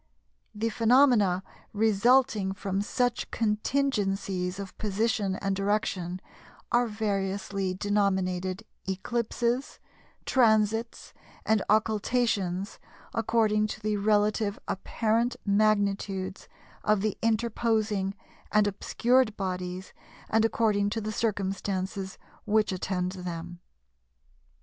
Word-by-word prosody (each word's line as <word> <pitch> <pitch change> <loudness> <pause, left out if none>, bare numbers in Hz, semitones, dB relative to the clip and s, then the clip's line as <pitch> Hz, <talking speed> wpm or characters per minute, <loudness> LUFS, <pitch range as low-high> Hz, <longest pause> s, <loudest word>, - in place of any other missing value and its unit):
The 225 +2 0
phenomena 225 -6 +4 0.3
resulting 220 0 +3
from 195 0 -2
such 245 +3 -1
contingencies 205 -5 0
of 200 -1 -7
position 210 -1 0
and 195 0 -1
direction 190 -3 -1 0.5
are 240 0 +3
variously 195 -2 -2
denominated 190 -1 0 0.3
Eclipses, 235 +5 -1 0.5
Transits, 225 -2 +2 0.3
and 220 -1 +3
Occultations, 210 -3 +1 0.3
according 220 -1 +2
to 215 - -6
the 210 0 -1
relative 210 0 +1
apparent 225 +4 0
magnitudes 200 -2 +1 0.4
of 210 -2 +2
the 215 -1 0
interposing 220 -3 0 0.4
and 210 -1 +4
obscured 230 +3 +1
bodies, 185 -1 -4 0.4
and 220 0 +4
according 215 -3 +2
to 225 - -2
the 215 0 -3
circumstances 195 -2 -2 0.3
which 215 0 +2
attend 185 -1 -2
them." 175 -2 -6
205 Hz, 90 wpm, -28 LUFS, 195-225 Hz, 0.5 s, phenomena